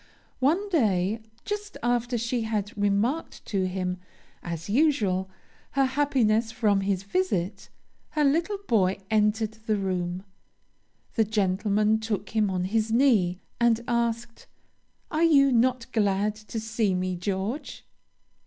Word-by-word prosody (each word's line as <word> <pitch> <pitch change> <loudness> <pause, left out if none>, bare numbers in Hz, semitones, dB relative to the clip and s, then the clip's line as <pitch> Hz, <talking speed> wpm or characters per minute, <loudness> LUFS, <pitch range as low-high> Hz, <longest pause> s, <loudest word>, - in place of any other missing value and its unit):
One 325 +10 +2
day, 215 - +1 0.2
just 415 0 -4
after 240 0 +1
she 235 +1 -1
had 215 -2 -2
remarked 205 +9 0
to 190 -3 0
him, 180 -1 -2 0.4
as 170 -1 -5
usual, 205 -7 +2 0.4
her 275 0 +3
happiness 255 -5 +1
from 210 -3 +2
his 195 -1 -1
visit, 200 - -1 0.4
her 300 - 0
little 330 +8 +2
boy 195 -4 +2
entered 215 0 +2 0.2
the 215 - +2
room. 185 -2 -2 0.9
The 225 - +3
gentleman 210 +1 +1
took 220 -3 -3
him 215 -2 +2
on 185 -1 -1
his 220 +3 0
knee, 220 -8 +3 0.2
and 235 -1 +4
asked, 235 -1 -2 0.6
'Are 310 - 0
you 280 -4 +5
not 250 0 +2
glad 205 -1 +1
to 215 +1 -7
see 220 -3 0
me, 185 0 -1
George?' 195 - -4
220 Hz, 125 wpm, -26 LUFS, 195-245 Hz, 0.9 s, you